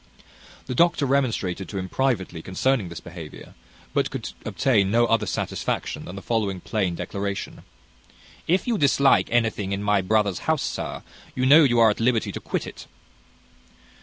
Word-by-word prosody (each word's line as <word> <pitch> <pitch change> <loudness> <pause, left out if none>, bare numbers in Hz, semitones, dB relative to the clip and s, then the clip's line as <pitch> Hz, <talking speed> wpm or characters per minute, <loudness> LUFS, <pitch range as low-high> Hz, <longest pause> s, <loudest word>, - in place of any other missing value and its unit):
The 130 - -4
doctor 170 +1 +3
remonstrated 115 -9 -1
to 100 - -5
him 95 -1 -3
privately 95 -8 -1
concerning 100 +3 0
this 85 -1 -7
behaviour, 85 -3 -10 0.4
but - - +1
could - - -5 0.2
obtain 110 -8 +2
no 120 +3 +3
other 115 -2 +1
satisfaction - - -3
than 90 - -8
the 95 - -8
following 105 -5 -1
plain 95 -3 -1
declaration: 100 +2 -4 0.9
"If 180 +3 +2
you 230 -4 0
dislike 140 -1 +4
anything 110 -4 0
in 100 +1 -3
my 105 -1 +2
brother's 100 0 +1
house, 155 -5 +2
sir, - - -4 0.3
you 130 - 0
know 150 +5 +8
you 120 -4 +3
are 115 -2 +6
at - - -5
liberty 115 -1 +1
to - - -6
quit - - -3
it." - - -10
110 Hz, 165 wpm, -24 LUFS, 95-130 Hz, 0.9 s, know